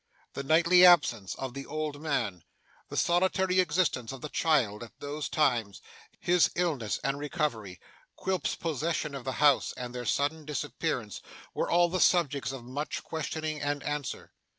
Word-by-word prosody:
The - - -4
nightly 170 +5 +5
absence 140 - +5
of 130 -2 -5
the 140 +1 -7
old 155 -2 -4
man, 105 - -2 0.5
the - - -6
solitary 185 +1 +2
existence 150 -9 +1
of 135 -2 -8
the 150 - -5
child 125 -12 +1
at 115 -4 -11
those 145 +1 -4
times, 115 - +1 0.4
his 175 -1 +3
illness 150 - -1
and 135 +1 -1
recovery, 120 - -3 0.4
Quilp's 190 -1 -1
possession 160 -1 -2
of 135 -3 -7
the 130 - -2
house, 145 -1 +3
and 125 -1 -6
their 125 -1 -5
sudden 145 +7 0
disappearance, 145 - -3 0.3
were - - -1
all 175 0 +4
the 185 +2 -2
subjects 145 -8 +2
of 135 -3 -7
much 140 +5 -4
questioning 155 -1 -4
and 145 -1 -2
answer. 145 -3 -4
145 Hz, 155 wpm, -29 LUFS, 130-165 Hz, 0.5 s, nightly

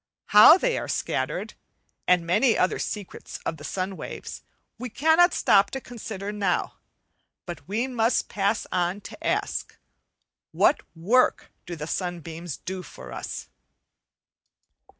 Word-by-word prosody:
How 210 - +9
they - - 0
are - - -5
scattered, - - -2 0.5
and 180 -2 +4
many 220 +8 +3
other 185 - +1
secrets 205 -3 -6
of 160 - -2
the 145 - -12
sun 185 +5 -3
waves, - - -7 0.4
we 250 +1 -5
cannot 320 - +4
stop 200 0 +4
to 270 - -4
consider 215 -5 -6
not, 200 -4 -1 0.7
but 175 0 -8
must 235 +2 +1
pass 205 +2 0
on 180 +2 0
to - - -11
ask - - -2 0.8
What - - +3
work 220 +11 +2 0.2
do 175 - -5
the 150 -2 -6
sunbeams 170 -2 -4
do 190 0 -6
for 175 - -11
us? - - -6
195 Hz, 130 wpm, -25 LUFS, 175-235 Hz, 0.8 s, How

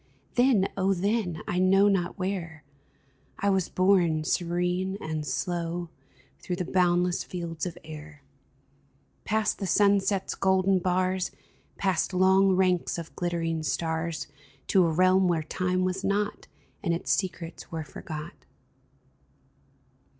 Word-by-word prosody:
Then, 245 -6 +4
oh 195 0 +1
then, 190 -3 -1
I 180 - 0
know 195 +2 +5
not 185 -3 0
where, 180 -5 -4 0.7
I 200 0 +1
was 190 -3 +1
borne, 180 -4 +3
serene 180 +3 -1
and 155 -3 -4
slow, 170 +4 -2 0.5
Through 180 - -3
the 180 0 -3
boundless 180 0 +2
fields 170 -1 -4
of 175 -1 -7
air 150 -2 -10 0.5
— 140 0 -39
Past 220 0 0
the 195 - -2
sunset's 200 +1 +2
golden 190 0 +2
bars, 185 +1 0 0.5
Past 185 -1 0
long 190 +1 +5
ranks 180 -2 +1
of 165 -1 -8
glittering 165 -2 -1
stars, 160 -1 -2 0.4
To 185 -3 +5
a - - 0
realm 185 +3 +4
where 165 -3 +1
time 185 +3 -1
was 185 +1 -2
not, 205 +1 -1 0.3
And 170 - 0
its 170 - -3
secrets 175 -3 -3
were 160 -1 -3
forgot 150 +1 -7
180 Hz, 130 wpm, -27 LUFS, 165-190 Hz, 0.7 s, know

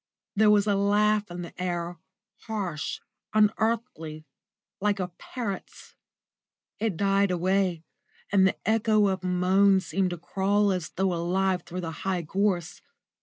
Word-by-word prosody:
There 215 +1 +5
was 205 -1 +5
a 205 - +2
laugh 205 +1 +2
in 175 0 -6
the 170 - -9
air, 175 -1 -3 0.5
harsh, 190 -9 -3 0.3
unearthly, 210 -7 0 0.5
like 205 0 +1
a 180 -1 -2
parrot's. 200 +2 -7 0.9
It 215 -6 -1
died 200 +1 +2
away, 180 -1 +1 0.5
and 190 -1 +5
the - - 0
echo 215 -2 +3
of 190 -1 -2
a - - -2
moan 190 +2 +4
seemed 190 0 -1
to 175 - -4
crawl 200 +4 +1
as 180 -4 -2
though 190 -1 0
alive 180 +2 0
through 180 +1 -6
the 165 -2 -4
high 185 -3 -1
gorse. 180 0 -1
190 Hz, 140 wpm, -27 LUFS, 180-205 Hz, 0.9 s, There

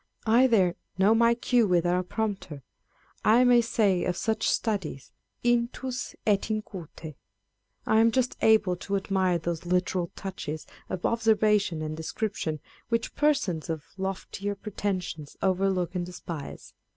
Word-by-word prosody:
I 235 +4 +5
there 190 -7 +3
" - - -43
know 195 +3 +5
my 235 +1 +4
cue 240 -1 +2
without 175 0 +2
a - - +1
prompter." 190 - -4 0.6
I 230 +4 +5
may 245 -1 +6
say 210 -6 +1
of 180 -1 -1
such 220 -1 0
studies 190 - -2 0.3
Intns 245 +2 -1
et 205 0 +2
in 215 -1 -1
cute* 165 -5 -9 0.7
I 220 - +4
am 230 +1 +6
just 250 +1 0
able 215 -5 +4
to 200 +3 -3
admire 190 -2 +1
those 170 0 -3
literal 180 -1 0
touches 185 -6 -5 0.2
of 180 - -3
observation 210 -7 +2
and 155 0 -4
description 160 -1 -3 0.3
which 230 0 -1
persons 210 - +1
of 160 -3 -3
loftier 195 +1 -4
pretensions 190 -7 -4
overlook 190 -2 +1
and 180 -2 -1
despise. 170 -4 -8
195 Hz, 140 wpm, -27 LUFS, 175-220 Hz, 0.7 s, may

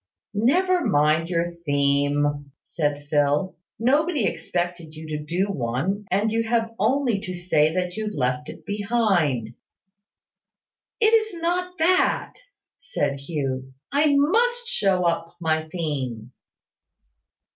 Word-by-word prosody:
"Never 350 - +2
mind 155 - +2
your 170 0 -1
theme!" 145 0 +1
said 145 -2 -2
Phil. 145 +5 +2 0.2
"Nobody 285 - +2
expected 170 -1 -3
you 155 +1 -9
to 150 - -5
do 175 +5 0
one; 155 - -2
and 205 +4 +1
you 225 +1 +1
have 230 0 0
only 240 0 +2
to 185 -3 -6
say 160 -4 +2
that 180 -1 -1
you 215 0 -3
left 130 -5 -2
it - - -11
behind 200 - +1
you." - - -15 1.5
"It 440 0 +5
is 435 -6 +2
not 360 +2 -1
that," 355 +3 +2 0.5
said 280 - -2
Hugh. 135 -3 -4 0.2
"I 285 +1 +3
must 475 +12 +2
show 195 - +1
up 165 0 -1
my 160 -1 -1
theme." 130 -9 -4
180 Hz, 125 wpm, -24 LUFS, 145-240 Hz, 1.5 s, It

